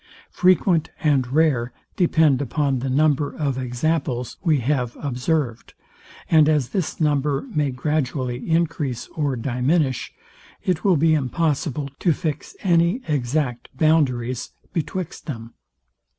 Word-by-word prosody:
Frequent 180 Hz, -2 st, +3 dB
and 135 Hz, -5 st, +2 dB
rare 135 Hz, -5 st, +2 dB, 0.2 s
depend 160 Hz, -6 st, +3 dB
upon 140 Hz, -1 st, 0 dB
the 130 Hz, +2 st, -3 dB
number 145 Hz, +1 st, +2 dB
of 140 Hz, -4 st, -1 dB
examples 125 Hz, 0 st, -2 dB
we 160 Hz, -4 st, +3 dB
have 125 Hz, -2 st, -1 dB
observed; 125 Hz, -2 st, -2 dB, 0.5 s
and 155 Hz, -2 st, +5 dB
as 145 Hz, -6 st, +1 dB
this 180 Hz, +2 st, -2 dB
number 145 Hz, -2 st, +1 dB
may 150 Hz, -3 st, +1 dB
gradually 130 Hz, -2 st, -2 dB
encrease 160 Hz, -7 st, 0 dB
or 145 Hz, -4 st, -1 dB
diminish, 130 Hz, +4 st, 0 dB, 0.5 s
it 180 Hz, -4 st, 0 dB
will 190 Hz, -5 st, +4 dB
be 160 Hz, +2 st, +4 dB
impossible 145 Hz, 0 st, 0 dB
to 170 Hz, -, +3 dB
fix 155 Hz, -2 st, -4 dB
any 175 Hz, +6 st, +2 dB
exact 130 Hz, -3 st, -1 dB
boundaries 130 Hz, -6 st, +1 dB, 0.2 s
betwixt 175 Hz, +1 st, -4 dB
them. 115 Hz, -5 st, -6 dB
145 Hz, 120 wpm, -22 LUFS, 125-160 Hz, 0.5 s, and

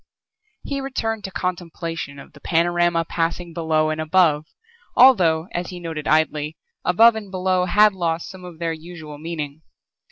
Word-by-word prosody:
He 280 Hz, -1 st, -3 dB
returned 225 Hz, -5 st, -3 dB
to 190 Hz, -, -6 dB
contemplation 165 Hz, -5 st, -4 dB
of 140 Hz, -, -13 dB
the 150 Hz, -, -15 dB
panorama 170 Hz, +1 st, +1 dB
passing 170 Hz, +1 st, -2 dB
below 160 Hz, -2 st, +1 dB
and 155 Hz, 0 st, -2 dB
above, 155 Hz, -2 st, +3 dB, 0.5 s
although 180 Hz, -11 st, +5 dB
as 175 Hz, +1 st, -3 dB
he 180 Hz, -2 st, -7 dB
noted 160 Hz, -3 st, -5 dB
idly, 155 Hz, 0 st, +1 dB, 0.3 s
above 225 Hz, +6 st, +6 dB
and 210 Hz, -3 st, -6 dB
below 185 Hz, -1 st, +1 dB
had 210 Hz, +3 st, +5 dB
lost 170 Hz, -3 st, -2 dB
some 190 Hz, -1 st, -11 dB
of 175 Hz, -2 st, -10 dB
their 165 Hz, 0 st, -2 dB
usual 160 Hz, -2 st, -10 dB
meaning. 155 Hz, -2 st, -5 dB
170 Hz, 155 wpm, -22 LUFS, 160-185 Hz, 0.5 s, above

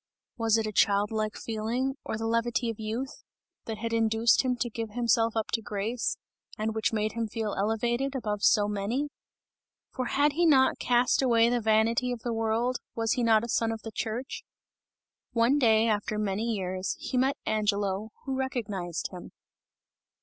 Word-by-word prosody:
Was 225 Hz, -2 st, +2 dB
it 225 Hz, -, 0 dB
a 215 Hz, -, -3 dB
childlike 210 Hz, +2 st, +1 dB
feeling, 230 Hz, +4 st, -2 dB
or -, -, -3 dB
the 225 Hz, -, -3 dB
levity 230 Hz, +1 st, 0 dB
of 225 Hz, -, -11 dB
youth, 225 Hz, +5 st, -4 dB, 0.4 s
that 220 Hz, -1 st, -4 dB
had 230 Hz, +1 st, -3 dB
induced 225 Hz, 0 st, +3 dB
him 255 Hz, -1 st, 0 dB
to 240 Hz, 0 st, -2 dB
give 225 Hz, -2 st, -5 dB
himself 230 Hz, -1 st, +2 dB
up 220 Hz, -, -1 dB
to 225 Hz, -, 0 dB
grace, 215 Hz, +3 st, -2 dB, 0.4 s
and 220 Hz, +1 st, -1 dB
which 220 Hz, -1 st, 0 dB
made 215 Hz, -1 st, 0 dB
him 230 Hz, -1 st, -2 dB
feel 215 Hz, -1 st, -3 dB
elevated 240 Hz, +6 st, 0 dB
above 210 Hz, -5 st, -2 dB
so 205 Hz, 0 st, +4 dB
many? 210 Hz, +8 st, -2 dB, 0.8 s
For 255 Hz, -, -3 dB
had 290 Hz, +4 st, +2 dB
he 340 Hz, +3 st, +3 dB
not 265 Hz, -4 st, +4 dB
cast 245 Hz, +1 st, +3 dB
away 235 Hz, -3 st, +4 dB
the 240 Hz, 0 st, +1 dB
vanity 225 Hz, +3 st, +2 dB
of 240 Hz, -2 st, -4 dB
the 240 Hz, -, -1 dB
world, 225 Hz, +3 st, 0 dB, 0.2 s
was 225 Hz, -1 st, 0 dB
he 250 Hz, -, +1 dB
not 225 Hz, -2 st, +4 dB
a -, -, -3 dB
son 230 Hz, -1 st, +1 dB
of 225 Hz, -1 st, -6 dB
the 225 Hz, -, -6 dB
church? 235 Hz, +4 st, -4 dB, 0.9 s
One 240 Hz, +5 st, +3 dB
day, 225 Hz, -3 st, +4 dB
after 210 Hz, -1 st, 0 dB
many 210 Hz, +1 st, -1 dB
years, 185 Hz, -2 st, -2 dB
he -, -, -5 dB
met 265 Hz, +2 st, +2 dB
Angelo, 205 Hz, -1 st, 0 dB, 0.2 s
who 270 Hz, -1 st, -2 dB
recognized 210 Hz, -, -3 dB
him. 180 Hz, -2 st, -9 dB
225 Hz, 175 wpm, -28 LUFS, 215-240 Hz, 0.9 s, so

